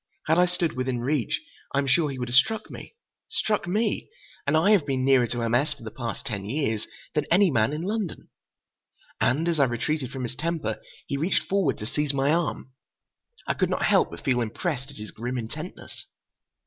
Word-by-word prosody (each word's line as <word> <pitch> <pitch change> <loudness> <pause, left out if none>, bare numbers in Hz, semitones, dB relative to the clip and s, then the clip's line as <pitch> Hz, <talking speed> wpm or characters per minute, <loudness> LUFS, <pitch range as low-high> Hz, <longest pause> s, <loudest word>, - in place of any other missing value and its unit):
Had 160 +2 +3
I 180 - +5
stood 180 -2 0
within 130 -1 -1
reach, 130 -2 0 0.4
I - - +2
am 140 - +2
sure 150 +3 +3
he 135 - -5
would 125 -1 -3
have 120 - 0
struck 220 +11 +4
me. - - -10 0.3
Struck 210 -4 0
me! 210 +4 0 0.4
And 150 +2 +4
I 170 +6 +4
have 200 -7 +5
been 135 -3 -1
nearer 130 -3 +5
to 120 0 -2
M. 115 0 0
S. 145 +5 +2
for 135 - -15
the 110 - -6
past 120 -1 -5
ten 105 -7 -3
years 110 -1 -1 0.3
than 150 - +1
any 185 0 +5
man 115 -1 +3
in 155 +2 -3
London. 205 -2 -3 0.9
And 150 +7 +2
as 165 -3 +1
I 140 - +6
retreated 130 +3 -1
from 130 -1 -5
his 125 +1 -4
temper, 165 +1 -2 0.2
he 140 - -2
reached 165 +7 +1
forward 185 - +1
to 105 - -6
seize 145 +4 0
my 140 +1 +2
arm. 160 -5 -1 0.7
I - - +1
could - - +1
not - - 0
help - - +4
but - - -10
feel 125 -3 +2
impressed 130 - -2
at 140 - -11
his 105 0 -6
grim 120 +3 -4
intentness. 115 -2 -7
140 Hz, 210 wpm, -26 LUFS, 125-165 Hz, 0.9 s, I